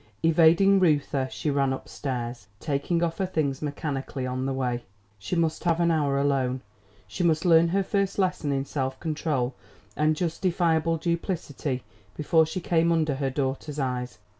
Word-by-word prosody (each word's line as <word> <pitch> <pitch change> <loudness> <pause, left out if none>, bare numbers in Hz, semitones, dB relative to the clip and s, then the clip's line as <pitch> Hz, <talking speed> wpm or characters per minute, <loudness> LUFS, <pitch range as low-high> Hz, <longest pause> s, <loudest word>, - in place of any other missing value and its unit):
Evading 170 +4 +5
Reuther, 145 -6 +2
she 150 - -2
ran 140 -1 +1
up 130 - -5
stairs, 120 -6 -5
taking 155 +4 -1
off 165 +2 -2
her 190 - +1
things 145 -6 -1
mechanically 140 -3 -3
on 130 +1 -2
the - - -1
way. 125 -2 -2 0.4
She 110 - -3
must 165 -2 0
have 170 -1 +2
an 170 -1 +3
hour 145 -4 +1
alone. 135 -2 +1 0.5
She 135 - -3
must 165 0 +2
learn 165 -1 +6
her 195 +3 +1
first 195 0 -1
lesson 180 -6 0
in 135 0 -1
self 130 -2 -3
control 150 -5 -1 0.4
and 155 +1 +2
justifiable 165 -1 +1
duplicity 160 -6 -2 0.3
before 160 +1 +3
she 185 - -3
came 170 -1 +2
under 155 -3 +2
her 135 -1 0
daughter's 140 +2 -3
eyes. 125 -3 -2
150 Hz, 165 wpm, -26 LUFS, 135-165 Hz, 0.5 s, learn